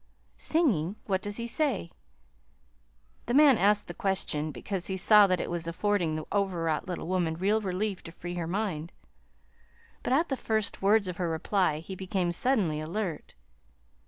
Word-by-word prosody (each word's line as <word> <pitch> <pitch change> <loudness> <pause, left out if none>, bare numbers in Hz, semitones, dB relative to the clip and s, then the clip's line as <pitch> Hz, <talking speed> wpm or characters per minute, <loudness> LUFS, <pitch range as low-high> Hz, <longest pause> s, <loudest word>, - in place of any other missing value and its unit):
"Singing? 210 - +1
What 190 -2 0
does 205 +1 -4
he 235 - -3
say?" 235 - -1 1.4
The 240 - 0
man 285 -4 +7
asked 205 +2 +3
the 175 - -6
question 160 -5 -1
because 190 +3 -4
he 190 - -2
saw 210 +2 +7
that 185 -2 +1
it - - -2
was 170 -1 -3
affording 175 -2 0
the 155 -1 -4
overwrought 175 -5 0
little 180 -3 -4
woman 175 -3 0
real 205 +6 +1
relief 195 0 -2
to 165 - -8
free 175 +1 -7
her 175 -2 -3
mind; 175 -4 -3 1.1
but - - -3
at 315 +6 +3
the 270 - 0
first 220 -4 -2
words 200 +1 +3
of 180 -1 -4
her 175 -2 -1
reply 165 0 +1
he 190 - -8
became 185 -1 -1
suddenly 185 - +1
alert. 165 +1 -4
190 Hz, 165 wpm, -29 LUFS, 170-210 Hz, 1.4 s, man